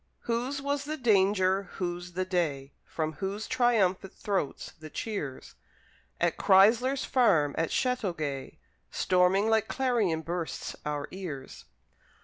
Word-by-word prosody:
Whose 250 +4 -2
was 285 0 -1
the 310 +1 -3
danger, 195 -5 +2
whose 175 -1 -4
the 185 +1 -1
day, 150 -7 -1
From 155 -1 -3
whose 195 +7 -4
triumphant 215 -7 +1
throats 195 -9 -2
the 155 0 -9
cheers, 150 -10 -5 0.7
At 170 -1 +1
Chrysler's 225 +8 +4
Farm, 165 - +3
at 165 0 0
Chateauguay, 170 - -2 0.3
Storming 185 +3 +2
like 220 -1 +2
clarion 225 -12 0
bursts 170 0 -4
our 145 -1 -2
ears? 165 -8 -7
190 Hz, 120 wpm, -29 LUFS, 165-230 Hz, 0.7 s, Chrysler's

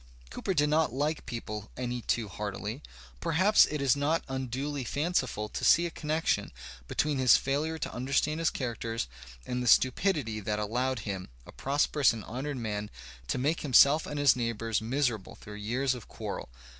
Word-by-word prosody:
Cooper 190 - -2
did 150 -1 +3
not 155 +1 +2
like 145 +5 -2
people 105 -3 -5
any 125 -1 -3
too 115 -1 -1
heartily. 105 - -5 0.4
Perhaps 185 - +4
it 150 -2 -3
is 135 -2 +4
not 150 +4 +1
unduly 135 +2 -3
fanciful 145 -6 -1
to - - -5
see 170 - +6
a 170 - -3
connection 155 +1 -1 0.4
between 145 - 0
his 125 -3 +7
failure 150 +4 -1
to - - -4
understand 140 +5 0
his 165 - +2
characters 115 - -3 0.4
and 125 0 -2
the 125 - -2
stupidity 130 - +3
that 105 +1 -2
allowed 120 +3 -1
him, 95 -2 -5 0.2
a - - -11
prosperous 140 -1 +2
and 110 -2 -6
honoured 135 +4 -4
man, 105 -3 -3 0.4
to - - -1
make 145 +6 0
himself 145 +2 +5
and 150 - -5
his 145 -3 +6
neighboims 115 -2 -1
miserable 120 -3 -1
through 105 - -11
years 120 +6 -1
of 125 -5 -9
quarrel. - - -6
130 Hz, 170 wpm, -29 LUFS, 115-150 Hz, 0.4 s, his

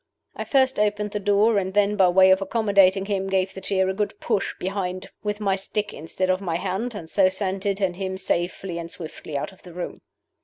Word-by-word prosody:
I - - -4
first 265 -3 +2
opened 210 0 0
the 210 - -2
door, 205 +2 +3
and 190 0 -4
then, 205 0 +3
by 190 -3 +5
way 190 +1 +6
of 190 +1 +4
accommodating 195 -2 +3
him, 195 -1 -1
gave 190 0 0
the 190 - -8
chair 190 -1 +1
a 190 - 0
good 205 +1 -3
push 195 - -1
behind 185 -1 -4
with 210 0 -3
my 200 -2 +1
stick 205 +2 -3
instead 185 +4 -2
of 185 +1 0
my 175 -4 -2
hand, 195 +7 -2
and 170 -6 -7
so 185 +2 +4
sent 190 +1 -2
it 200 0 +1
and 190 -3 0
him 190 -1 -3
safely 180 -1 -2
and 170 0 -6
swiftly 160 -3 -6
out 140 - -4
of 190 - -19
the 175 - -12
room. 180 0 -6
195 Hz, 225 wpm, -24 LUFS, 185-205 Hz, -, way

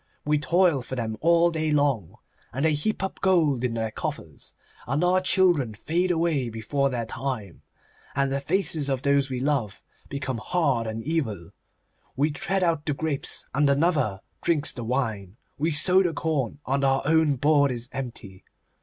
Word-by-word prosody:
We 150 0 +2
toil 170 -2 +2
for 125 +2 -6
them 115 -3 -3
all 170 +1 +4
day 160 -1 -1
long, 140 - 0 0.4
and 135 +5 -1
they 160 - +3
heap 185 +7 -2
up 190 - -4
gold 160 -9 +2
in 120 -2 -1
their 110 -1 -2
coffers, - - -6 0.3
and 135 +7 0
our 185 +1 +3
children 175 - +2
fade 170 - -1
away 165 -7 0
before 115 +5 -1
their 120 -3 -3
time, 115 -6 -5 0.5
and 140 0 +1
the 140 - 0
faces 155 -2 0
of 135 -1 -1
those 140 -1 +2
we 130 -1 -3
love 130 -7 -1 0.3
become 135 -3 -3
hard 135 -4 0
and 110 +1 -4
evil. 115 - -3 0.6
We 150 +3 +1
tread 190 +6 -1
out 165 -4 +1
the 145 - 0
grapes, 155 -2 -2
and 145 +1 +3
another 140 - +1 0.2
drinks 160 -4 +3
the 120 - -7
wine. 110 -5 -2 0.2
We 155 +3 +1
sow 180 +5 +5
the 175 -3 0
corn, 140 -6 -1
and 140 +1 0
our 135 0 +2
own 160 -1 +3
board 145 +1 +3
is 120 0 -4
empty. 115 -8 -7
140 Hz, 170 wpm, -25 LUFS, 125-160 Hz, 0.6 s, sow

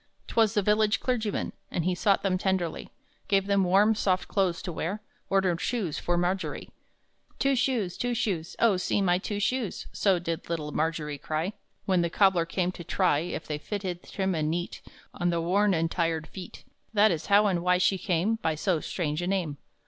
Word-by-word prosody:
'Twas 220 -3 +2
the 205 - +2
village 210 0 +3
clergyman, 225 -5 -1 0.2
And 170 - -2
he 185 - +2
sought 195 +2 +2
them 185 -2 +1
tenderly, 190 -4 -1 0.4
Gave 195 -2 +2
them 200 -1 +2
warm, 195 +4 +4
soft 185 -3 0
clothes 185 -4 0
to 180 - -4
wear. 185 +6 -3 0.3
Ordered 185 -3 +2
shoes 210 -11 -1
for 175 0 0
Margery. 180 +2 -2 0.7
"Two 275 0 +2
shoes, 245 -8 0
two 245 0 -1
shoes, 190 -8 -2
Oh, 220 -5 +4
see 180 - 0
my 180 -2 +2
two 205 +2 -3
shoes!" 220 +1 -1
So 195 -3 +3
did 165 -2 -4
little 155 -3 -3
Margery 150 -2 -2
cry, 160 +7 -2 0.3
When 185 -2 +2
the 170 - 0
cobbler 180 -2 +3
came 180 +1 0
to 180 - -9
try 175 -3 +2
If 165 0 -4
they 150 -1 -4
fitted 185 -1 -4
trim 190 -2 -2
and 155 -2 0
neat 175 +2 -3 0.3
On 175 - 0
the 170 -1 0
worn 190 +4 +2
and 165 0 0
tired 165 -2 0
feet: 185 +1 -10 0.3
That 210 0 +6
is 160 -3 -3
how 205 +1 +5
and 185 -4 +1
why 180 +1 +3
she 185 +1 +2
came 190 +5 +1
By 160 -7 -1
so 170 +1 0
strange 155 -1 -2
a 175 - -2
name. 180 -7 -1
185 Hz, 195 wpm, -28 LUFS, 170-205 Hz, 0.7 s, That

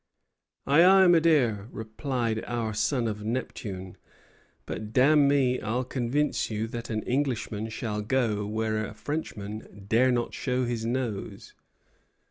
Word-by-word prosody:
'Ay, 145 +5 +5
ay, 190 +1 +7
my 175 -2 +6
dear,' 125 -11 +2
replied 110 0 -3
our 115 -2 -2
son 120 +3 0
of 105 -1 -4
Neptune, 105 -5 -4 0.7
'but, 110 0 -6
damn 145 +2 +5
me, 135 -3 +2
I'll 120 +4 -1
convince 130 +3 -1
you 110 0 -2
that 120 0 -6
an 110 -1 -2
Englishman 120 -5 -1
shall 110 -2 -3
go 110 -2 0
where 110 0 -1
a 105 - -7
Frenchman 110 -7 -6
dare 120 +5 +4
not 120 -1 -1
show 125 -1 -1
his 115 -2 -2
nose.' 120 -5 -4
120 Hz, 135 wpm, -27 LUFS, 110-130 Hz, 0.7 s, ay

